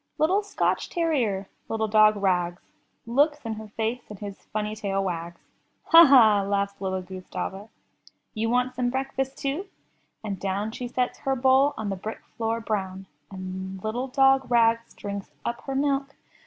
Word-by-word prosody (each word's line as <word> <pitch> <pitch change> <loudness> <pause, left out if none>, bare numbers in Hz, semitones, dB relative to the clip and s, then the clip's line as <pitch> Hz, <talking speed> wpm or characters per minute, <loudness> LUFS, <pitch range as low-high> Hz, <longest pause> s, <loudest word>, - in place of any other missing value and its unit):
Little 370 +7 +3
Scotch 410 - -1
terrier, 250 - 0 0.2
little 220 0 0
dog 215 0 +5
Rags, 180 -2 0 0.4
Looks 290 +6 +3
in 225 - -2
her 220 0 -8
face 225 +3 -2
and 210 - -8
his 200 -1 -9
funny 215 0 -3
tail 195 -2 -1
wags. 170 -2 -4 0.5
''Ha! 335 -1 +10
ha! 220 -7 +7
laughs 200 0 -1
little 190 -1 -2
Gustava. 190 +2 -6 0.6
"You 225 0 -1
want 250 +1 +1
some 250 -1 0
breakfast 270 +1 -2
too? 290 +8 -3 0.6
and 200 -3 -4
down 200 +3 -2
She 245 +2 -5
sets 250 0 -2
her 270 0 0
bowl 265 +3 +4
on 220 -2 -3
the - - -1
brick 215 +4 -7
floor, 225 0 -1
brown; 195 -4 -3 0.2
And 190 0 -6
little 240 +4 -2
dog 270 0 +3
Rags 230 -1 +2
drinks 200 -1 -6 0.2
up 235 0 -3
her 270 - -3
milk. 275 0 0
220 Hz, 160 wpm, -26 LUFS, 195-265 Hz, 0.6 s, Ha